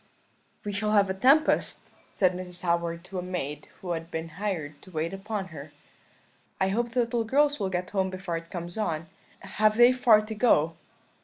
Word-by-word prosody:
"'We 205 - -2
shall 210 +1 -1
have 200 -2 +4
a - - 0
tempest,' 275 +10 +3 0.3
said 185 -2 +2
Mrs. 180 0 -7
Howard 170 -1 0
to 185 0 -6
a - - -2
maid 150 -5 -4
who 180 - -4
had 165 -1 -4
been 160 -1 -4
hired 165 -5 -4
to - - -14
wait 165 +1 -2
upon 195 0 -4
her; 150 -3 -9 0.9
'I 190 - +2
hope 235 +4 0
the 250 - +3
little 235 0 0
girls 290 +5 +2
will 195 -2 -1
get 180 0 -3
home 190 -2 +1
before 185 -2 -4
it 165 0 -9
comes 175 +2 -6
on 165 -6 -1 0.4
have 215 0 +1
they 240 +1 +7
far 235 -4 +5
to 220 - -5
go?' 185 -8 +3
190 Hz, 190 wpm, -27 LUFS, 170-215 Hz, 0.9 s, they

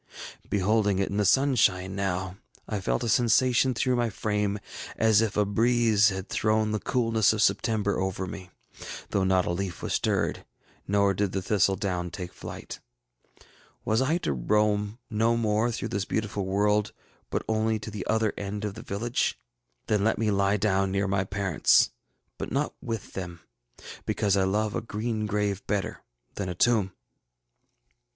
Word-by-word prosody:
Beholding 100 0 +2
it 95 - 0
in 100 - -3
the 105 - +2
sunshine 100 -8 +3
now, 95 -1 -2 0.3
I 105 -3 -3
felt 60 -9 -1
a - - -1
sensation 125 +2 +3
through 125 +3 +1
my 120 -1 +1
frame 105 -1 -1 0.4
as 110 -1 +4
if 110 -3 -1
a 105 - +3
breeze 110 0 +3
had 95 0 -5
thrown 110 0 +1
the 105 - -1
coolness 115 -4 +2
of 110 - -1
September 100 +1 +1
over 95 0 -2
me, 95 0 -8 0.6
though 100 - +1
not 95 -1 +2
a - - -1
leaf 90 0 -4
was - - -2
stirred, - - 0 0.4
nor 100 0 +3
did 100 0 -1
the 95 - -1
thistle 100 -1 +2
down 90 -2 -2
take 90 +1 -7
flight. - - -8 1.1
Was 110 +3 +2
I 150 +6 +2
to 175 - -2
roam 105 - +1
no 115 +2 +2
more 110 +1 +1
through 115 - -4
this 100 0 -2
beautiful 105 -3 -2
world, 105 +2 +1 0.4
but - - -2
only 110 0 +1
to 110 +1 -7
the 105 -3 -5
other 110 -1 +1
end 100 +1 -4
of 105 - -3
the 110 - -9
village? 115 +3 -1 0.5
Then 105 -2 +1
let 110 - +2
me 110 -2 +1
lie 100 +1 +2
down 95 -1 +1
near 100 +1 0
my 95 0 0
parents, 95 -4 +3 0.5
but - - -4
not - - 0
with 115 -3 -5
them, 85 -3 -6 0.7
because 100 -2 +1
I 95 -1 +2
love 105 +2 0
a - - -1
green 110 0 -3
grave 105 -1 -1
better 105 -2 -2 0.3
than 95 -3 -4
a 90 - -4
tomb. 105 -1 +2
105 Hz, 170 wpm, -27 LUFS, 95-110 Hz, 1.1 s, as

